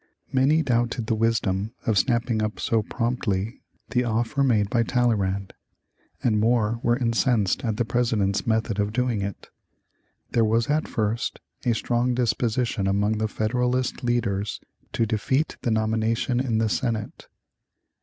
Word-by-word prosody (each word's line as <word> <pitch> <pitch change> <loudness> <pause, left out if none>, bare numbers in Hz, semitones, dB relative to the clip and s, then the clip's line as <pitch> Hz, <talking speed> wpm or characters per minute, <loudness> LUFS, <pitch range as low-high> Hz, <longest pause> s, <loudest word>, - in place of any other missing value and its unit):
Many 140 +5 +3
doubted 120 -2 0
the 110 - 0
wisdom 110 -2 0
of 110 -4 +2
snapping 115 +2 +1
up 105 0 -2
so 115 -1 +1
promptly 115 -2 -2 0.3
the 125 -1 +2
offer 120 +4 0
made 110 -6 +3
by 115 +3 +1
Talleyrand, 105 -5 0 0.7
and 110 -3 +2
more 115 0 +2
were 120 0 +2
incensed 115 -5 +1
at 110 -3 -1
the 120 - +1
President's 110 -5 0
method 110 -2 0
of 105 +1 0
doing 125 -3 0
it. 100 -1 -6 0.8
There 115 - +3
was 115 +5 +2
at 155 +1 +1
first 110 +1 -2 0.3
a 120 - +3
strong 120 +2 0
disposition 120 -3 0
among 105 +2 +1
the 110 - +1
Federalist 125 +4 -1
leaders 105 -4 -1 0.3
to 115 - +1
defeat 125 +7 0
the - - -1
nomination 110 +2 +1
in 125 -4 0
the 110 0 +2
Senate. 115 -1 -2
115 Hz, 145 wpm, -25 LUFS, 105-120 Hz, 0.8 s, Many